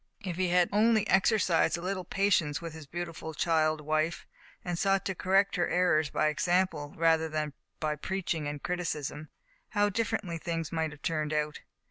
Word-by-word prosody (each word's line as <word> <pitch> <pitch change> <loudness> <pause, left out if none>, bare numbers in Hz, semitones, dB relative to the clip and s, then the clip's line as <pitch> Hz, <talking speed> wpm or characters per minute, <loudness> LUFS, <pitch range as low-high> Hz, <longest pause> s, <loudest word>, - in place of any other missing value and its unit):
If 180 -3 -4
he 185 0 +1
had 180 0 +4
only 215 +1 +3
exercised 185 -5 +3
a - - -7
little 185 +1 -2
patience 175 -6 +1
with 165 -2 -7
his 160 -2 -10
beautiful 165 -1 -6
child 155 -2 +2
wife, 155 +2 -1 0.4
and 175 -1 -1
sought 195 -1 +2
to 190 - -1
correct 195 +2 +2
her 175 - +2
errors 160 -4 +2
by 155 - +1
example, 170 -2 0
rather 160 -1 +3
than 155 -2 -2 0.3
by 155 -1 -1
preaching 170 -3 -2
and 145 -1 -5
criticism, 155 -4 -3 0.4
how 205 -2 +2
differently 205 -5 -2
things 165 -1 -3
might 160 -1 0
have 150 -1 -14
turned 155 -2 -1
out. 150 0 -1
170 Hz, 170 wpm, -30 LUFS, 155-185 Hz, 0.4 s, had